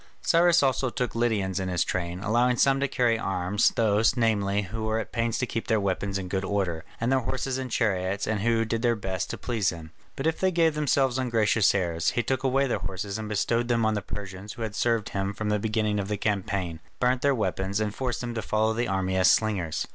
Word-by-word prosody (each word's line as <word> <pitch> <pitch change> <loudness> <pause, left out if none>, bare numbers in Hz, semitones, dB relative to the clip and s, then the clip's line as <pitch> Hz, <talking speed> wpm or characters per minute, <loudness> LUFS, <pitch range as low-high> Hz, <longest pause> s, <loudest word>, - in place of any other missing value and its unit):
Cyrus 170 -1 +4
also 130 -1 +1
took 120 -2 -3
Lydians 105 -5 0
in 95 -1 -2
his 90 -2 +1
train; 90 0 -3
allowing 120 +3 +2
some 135 +1 +3
to 140 - +1
carry 120 -4 +1
arms, 95 +2 +1
those, 110 +2 +2
namely, 105 -3 +1
who 110 +4 -6
were 110 0 0
at 110 -3 -4
pains 115 -1 0
to 125 - 0
keep 115 -1 -4
their 110 -3 +2
weapons 100 0 -1
in 95 -1 -5
good 95 +1 -2
order, 95 -5 -1 0.2
and 115 +3 0
their 135 - +4
horses 130 +1 -2
and 130 -1 -4
chariots, 100 -4 0
and 110 -1 -1
who 115 +1 +1
did 115 +1 -2
their 120 -1 +2
best 95 -2 -3
to - - -4
please 115 -6 0
him, 80 -2 -8 0.2
but 135 - -4
if 160 0 0
they 190 - +3
gave 165 -3 +2
themselves 135 -4 +1
ungracious 115 -4 +2
airs, 85 -4 0
he 120 - -1
took 130 0 -1
away 135 +1 +2
their 120 -6 -1
horses 95 +3 -4
and 110 -1 -5
bestowed 115 +3 0
them 115 -2 +2
on 110 - +2
the 105 - -1
Persians 100 +1 -7
who 115 - -6
had 110 -2 -4
served 115 -1 0
him 100 0 -3
from 110 -1 -3
the 105 0 +1
beginning 105 -1 0
of 100 - -3
the 105 0 -2
campaign, 100 -5 -2 0.2
burnt 125 0 +2
their 140 -1 +3
weapons, 95 -2 -1
and 105 -1 -1
forced 125 -1 -3
them 120 -1 -4
to 115 - -3
follow 110 +1 +1
the 120 +2 -1
army 95 0 -1
as 95 0 +5
slingers. 95 -8 +1
110 Hz, 235 wpm, -26 LUFS, 95-120 Hz, 0.2 s, as